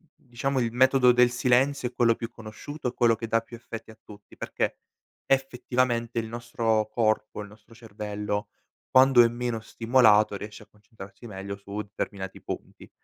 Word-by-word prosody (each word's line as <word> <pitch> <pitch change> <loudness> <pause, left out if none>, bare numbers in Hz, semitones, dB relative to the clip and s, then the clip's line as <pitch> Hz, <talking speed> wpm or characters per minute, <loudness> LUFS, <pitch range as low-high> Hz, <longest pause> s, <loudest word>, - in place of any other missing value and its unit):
diciamo 130 +2 -3
il 115 -1 -1
metodo 130 0 +5
del 125 0 +5
silenzio 125 +2 +2
è 125 - -24
quello 115 -2 +3
più 115 0 -6
conosciuto 125 +6 -8
e 125 - -2
quello 115 -1 +3
che 115 - -5
dà 115 0 +2
più 120 +1 -11
effetti 115 -1 -9
a 110 - -18
tutti 105 -1 -15
perché - - -2 0.5
effettivamente 125 -3 0
il 110 - -4
nostro 115 -2 -1
corpo, 110 -1 0
il 105 - -8
nostro 110 +1 -18
cervello, 105 -2 -4 0.4
quando 130 -2 +7
è - - +5
meno 120 -1 -3
stimolato 110 -2 +3
riesce 105 +1 -9
a - - -22
concentrarsi 105 +1 -13
meglio 100 -1 -6
su 100 +1 -6
determinati 100 -2 -6
punti. - - -8
115 Hz, 165 wpm, -26 LUFS, 105-125 Hz, 0.5 s, quando